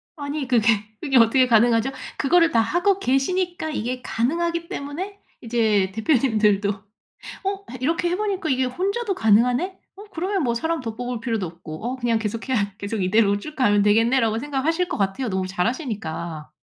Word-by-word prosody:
아니 285 -2 -4
그게 235 -3 +2 0.3
그게 270 -3 +2
어떻게 240 +3 +5
가능하죠? 235 +2 +3 0.3
그거를 335 +3 +3
다 230 - +3
하고 370 - +2
계시니까 345 +4 0
이게 250 -2 -3
가능하기 335 +9 -1
때문에 365 +9 -5 0.2
이제 220 -5 +1
대표님들도 220 -5 +2 0.5
'어 395 0 -5
해 255 - -7
이렇게 335 +5 +1
해보니까 385 -3 -1
이게 260 0 +2
혼자도 395 - -1
가능하네? 245 - +2 0.2
어 405 - -11
그러면 370 +1 -1
뭐 235 -2 +1
사람 325 +6 -1
더 225 -2 -5
뽑을 245 -1 -4
필요도 225 -5 -2
없고 165 +2 -9
어 255 +2 -2
그냥 235 -2 +1
계속해야 220 -1 -2
계속 205 -1 -3
이대로 200 +1 +3
쭉 305 +6 -9
가면 205 -6 +3
되겠네.'라고 225 +1 +3
생각하실 295 +6 -1
것 - - -3
같아요 210 +5 -1
너무 190 -1 -1
잘하시니까. 180 - -3
250 Hz, 385 characters per minute, -23 LUFS, 220-325 Hz, 0.5 s, 어떻게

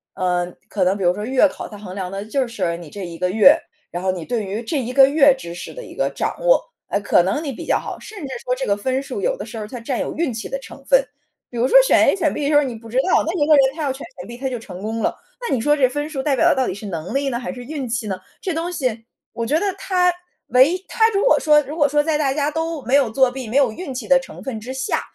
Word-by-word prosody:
呃， 180 -1 0 0.2
可 195 -3 0
能 190 +2 +2
比 195 - -3
如 175 0 +4
说 210 +2 -5
月 265 +4 +4
考， - - -7
它 210 - -10
衡 195 -3 -9
量 185 -2 -4
的 195 +1 -5
就 255 +4 -1
是 185 -7 -2
你 170 -3 -10
这 195 +1 -7
1 170 -1 -8
个 180 +1 0
月， 225 - +6 0.3
然 175 - -4
后 190 - +1
你 180 -3 -5
对 225 -1 -2
于 210 +5 -4
这 280 +6 -1
1 250 +1 -5
个 270 0 +7
月 285 -2 +5
知 170 -8 -8
识 175 - -8
的 - - -8
一 - - -11
个 - - 0
掌 - - -3
握， - - +4 0.2
呃， 200 - 0
可 200 - +4
能 195 - -1
你 280 - -3
比 - - -8
较 - - +2
好， - - -6
甚 425 - -11
至 - - -5 0.2
说 250 0 0
这 265 - -3
个 200 0 +1
分 260 +5 -1
数 400 - -5
有 - - +1
的 - - -6
时 225 - -7
候 210 - -5
它 245 - -7
占 250 +1 -2
有 - - -3
运 305 -6 -1
气 220 - -5
的 270 - -3
成 275 0 -12
分。 270 -1 +4 0.5
比 240 - -7
如 240 +2 +2
说 - - +6
选 - - +5
A - - +4
选 330 -6 0
B - - -3
的 - - +1
时 295 - +2
候 295 - +6
你 255 -3 -3
不 225 +1 -12
知 240 - -4
道， 365 - +3
那 335 - 0
一 295 -5 +1
个 310 - +5
人， 270 0 +3
他 320 - -4
要 275 - 0
全 270 - -7 0.2
选 - - -9
B 240 0 -9
他 265 - -3
就 255 -2 -3
成 190 -5 -10
功 220 +2 -3
了， - - +1 0.3
那 475 - -2
你 255 - +1
说 295 +5 +3
这 275 -3 +4
分 290 +3 -3
数 270 -4 -4
代 290 - +1
表 260 - +3
的 - - +4
到 260 - +1
底 - - -2
是 205 +2 -9
能 170 -1 -5
力 275 0 0
呢 240 -3 -1
还 245 - -4
是 245 -1 -9
运 290 0 -4
气 225 -1 -2
呢？ 190 -2 -2 0.2
这 370 - -2
东 330 +2 -2
西， 255 -9 -2 0.3
我 230 - -3
觉 305 +6 +2
得 - - -1
它， 360 -2 +2 0.3
唯 255 +5 +5
一 370 +1 -5
它 450 -1 +3
如 405 +2 0
果 - - +5
说 300 -1 +5
如 290 +4 -7
果 290 -3 +3
说 295 +1 +3
在 310 0 0
大 275 -3 +1
家 290 0 0
都 320 -1 -3
没 250 +5 +2
有 270 -5 +4
作 260 +3 +3
弊 255 -2 -7
没 245 - 0
有 275 -4 +4
运 280 0 -6
气 250 -4 -6
的 270 - +6
成 265 - -8
分 230 -5 -5
之 255 +3 -6
下， 265 0 -1
260 Hz, 335 characters per minute, -21 LUFS, 215-295 Hz, 0.5 s, 个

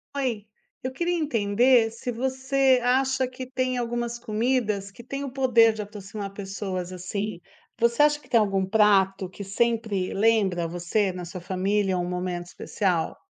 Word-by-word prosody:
Oi, 245 -7 -2 0.4
eu 255 - -2
queria 345 +6 -1
entender 235 -3 +3
se 230 +2 -5
você 265 +2 +2
acha 260 +1 +2
que 255 0 -8
tem 255 -1 -1
algumas 240 0 -3
comidas 215 -3 -1
que 235 - -13
têm 275 +3 -5
o 275 - -5
poder 240 -4 +4
de 215 - -5
aproximar 205 -1 -7
pessoas, 190 -2 -5
assim, 195 +2 -4 0.4
você 235 +4 +4
acha 295 0 +3
que - - -22
tem 235 - +5
algum 195 -3 +1
prato 195 -2 +3
que 190 +3 -9
sempre 215 -2 0
lembra 195 -5 +2
você 175 +4 0
na 180 -1 -7
sua 180 +1 -8
família 190 +1 0
um 175 0 -1
momento 180 -1 -3
especial? 180 -1 -1
215 Hz, 160 wpm, -25 LUFS, 195-250 Hz, 0.4 s, tem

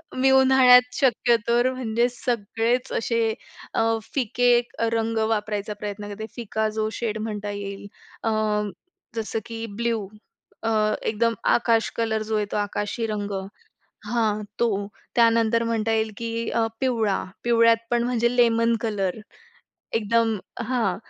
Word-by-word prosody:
मी 265 +1 +3
उन्हाळ्यात 260 -1 +6
शक्य 245 -2 +3
तर 240 +2 +3
म्हणजे 235 -1 0
सगळेचं 240 +1 -1
असे 230 -1 0 0.4
अ, 225 0 +2 0.2
फिके 245 -1 +3 0.3
रंग 225 0 0
वापरायचा 210 -1 -2
प्रयत्न 205 0 -5
करते, 210 +2 -6
फिका 220 -2 -2
जो 215 0 0
शेड 220 -2 -2
म्हणता 210 -2 -4
येईल. 200 0 -6 0.4
अ, 225 - +1 0.8
जसं 225 0 -2
की 230 -1 -5 0.2
ब्लू 230 -4 -1 0.6
अ, 225 - 0 0.3
एकदम 230 +1 +1 0.2
आकाश 230 -2 +2
कलर 220 -1 0
जो 220 - +1
आहे 210 - 0
तो - - -3
आकाशी 205 +2 -2
रंग 205 -1 -3 0.8
हां. 215 -2 0 0.2
तो 235 - +3 0.5
त्यानंतर 230 -1 +4
म्हणता 225 -1 0
येईल 220 0 +1
की 230 0 -3
अ, 230 -1 +1
पिवळा. 225 -6 +1 0.2
पिवळ्यात 230 -1 +5
पण 240 -1 +2
म्हणजे 240 0 +1
लेमन 230 -1 +4
कलर 205 -4 -1 0.7
एकदम 225 0 +1 0.3
हां. 225 -8 +1
230 Hz, 130 wpm, -24 LUFS, 215-235 Hz, 0.8 s, उन्हाळ्यात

